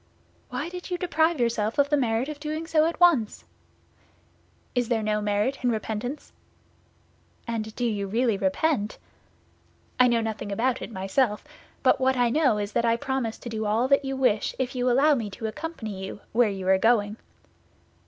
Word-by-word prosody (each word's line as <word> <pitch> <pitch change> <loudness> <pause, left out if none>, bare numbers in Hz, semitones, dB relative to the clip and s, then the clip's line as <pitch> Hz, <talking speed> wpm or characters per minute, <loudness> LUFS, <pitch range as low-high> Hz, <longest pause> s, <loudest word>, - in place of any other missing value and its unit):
"Why 260 +4 -3
did 360 +1 -8
you 355 - -1
deprive 325 -3 +1
yourself 230 0 0
of 285 +1 +2
the - - +5
merit 240 -2 0
of 300 -1 -6
doing 310 +2 -4
so 315 -1 +3
at 335 - -4
once?" 320 -12 +3 1.3
"Is 245 -2 0
there 225 -3 +1
no 210 0 0
merit 210 +6 0
in 245 - +3
repentance?" 225 +4 -4 1.1
"And 220 -2 -4
do 245 - -1
you 205 -4 -1
really 230 +2 +1
repent?" 210 +4 0 1.0
"I 250 - +7
know 235 -1 +2
nothing 220 -2 -4
about 245 +5 0
it - - -6
myself. 210 +3 0 0.4
But - - +4
what 260 0 +2
I 245 -1 +3
know 270 -6 +3
is 205 0 -3
that - - +1
I 230 0 +2
promise 265 -4 -2
to 240 - -8
do 220 -1 -3
all 230 +6 +1
you 270 -1 -4
wish 250 -5 +1
if 255 -1 -2
you 250 -1 0
allow 280 +5 +4
me 230 -7 -2
to 200 +3 -7
accompany 220 - -5
you 195 +1 -7
where 235 -1 +3
you 190 -2 -5
are 190 0 +5
going." 215 -1 +2
235 Hz, 180 wpm, -26 LUFS, 215-270 Hz, 1.3 s, I